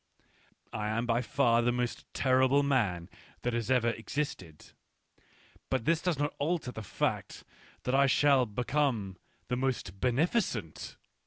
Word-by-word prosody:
I 105 0 -2
am 110 +2 -1
by 120 0 +1
far 125 -3 +2
the 120 +1 +2
most 120 0 -3
terrible 130 +1 +3
man 100 -12 +1 0.4
that 120 - 0
has 120 0 -2
ever 125 -3 +3
existed; 115 - -5 1.0
but 130 -4 -1
this 165 0 +2
does 180 -5 0
not 145 +1 -1
alter 155 -3 -1
the 110 - -7
fact 105 - -2 0.4
that 125 - -1
I 140 +1 +5
shall 135 -2 +4
become 120 -4 -1 0.3
the 125 - -1
most 125 -8 -2
beneficent. 125 - -1
125 Hz, 140 wpm, -30 LUFS, 115-140 Hz, 1.0 s, I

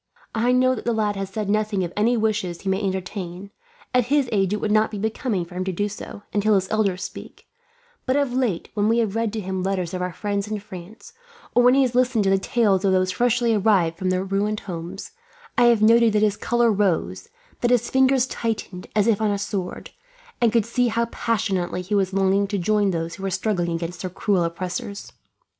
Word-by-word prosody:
"I 235 +2 +2
know 255 +1 +4
that 250 - -5
the 235 - 0
lad 210 -2 0
has 195 -1 -4
said 210 +1 -4
nothing 210 -1 0
of 175 0 -5
any 230 +4 +2
wishes 210 -6 -1
he 195 - -3
may 190 +1 0
entertain 190 -1 -4 0.4
at 250 -2 +3
his 280 -1 +2
age 195 -3 +1
it 210 - 0
would 210 - -1
not 215 +1 +3
be 215 - -6
becoming 220 -2 -2
for 175 - -14
him 185 +1 -2
to 190 - -1
do 205 +3 -1
so, 205 0 -9
until 210 +1 +3
his 190 -1 +1
elders 200 -4 0
speak - - -9 0.6
but 260 - +2
of 280 -3 +1
late, 245 -9 -1
when 210 0 +1
we 230 - +3
have 220 -3 0
read 225 -1 0
to 225 - -2
him 190 -2 -3
letters 185 -2 -1
from 185 -1 -4
our 180 0 -2
friends 200 +2 -3
in 215 0 -3
France, 195 +1 -11 0.4
or 245 - +5
when 250 +1 +5
he 275 - +5
has 250 -2 0
listened 250 -3 +2
to 195 - +2
the 195 - +3
tales 200 -2 +1
of 195 - +3
those 185 0 +2
freshly 240 +1 +2
arrived 195 -6 +2
from 185 -1 -1
their 185 0 0
ruined 200 +2 -1
homes, 180 - -7 0.4
I 245 - +4
have 235 -3 +4
noted 230 0 +5
that 210 0 +2
his 210 -1 +2
colour 240 +1 +2
rose; 205 - 0 0.3
that 240 - +1
his 240 -1 +2
fingers 265 -1 +4
tightened, 220 -7 -4
as 210 -2 +3
if 220 -2 +2
on 215 - +2
a 200 - 0
sword; 200 -2 -4 0.5
and 235 -2 +4
could 230 -2 +2
see 245 +1 +1
how 230 0 0
passionately 200 -6 -1
he 195 +4 -5
was 195 -2 +2
longing 195 +1 +2
to 200 0 -2
join 205 +2 +2
those 165 -2 -2
who - - -10
were 195 - -1
struggling 180 -3 -1
against 170 +1 -5
their 185 - -3
cruel 185 0 0
oppressors. 180 +4 -5
205 Hz, 225 wpm, -23 LUFS, 190-225 Hz, 0.6 s, or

